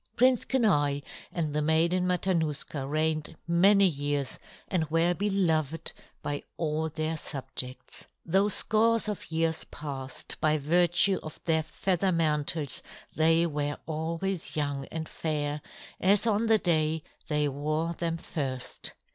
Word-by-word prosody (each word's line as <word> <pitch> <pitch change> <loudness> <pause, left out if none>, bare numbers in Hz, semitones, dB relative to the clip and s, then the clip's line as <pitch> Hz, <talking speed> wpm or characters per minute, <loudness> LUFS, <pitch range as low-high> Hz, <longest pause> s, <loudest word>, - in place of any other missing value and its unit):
Prince 255 0 +4
Kenai 145 - +2 0.3
and 155 -4 -1
the 150 - +1
Maiden 170 +4 +2
Matanuska 160 -6 0
reigned 155 +1 0
many 195 +4 +6
years 145 -4 0 0.3
and 165 -5 0
were 165 +2 +3
beloved 165 -6 0 0.3
by 145 0 -2 0.2
all 160 -1 -1
their 155 +1 -2
subjects. 130 -4 -6 0.2
Though 195 +5 +3
scores 225 +2 +2
of 210 -5 -4
years 160 0 +1
passed, 135 -3 -6
by 155 -1 +3
virtue 175 +5 +3
of 155 - -9
their 160 -1 +3
feather 185 +3 0
mantles 150 -3 0 0.3
they 165 +1 +4
were 145 -2 -2
always 165 +3 -3
young 145 -2 -1
and 160 -1 -5
fair 150 -2 -2 0.4
as 200 +3 +4
on 225 0 +2
the 220 0 +6
day 160 -4 +1 0.2
they 150 -1 +1
wore 155 +4 -1
them 165 -1 -2
first. 135 -6 -4
160 Hz, 130 wpm, -29 LUFS, 150-180 Hz, 0.4 s, many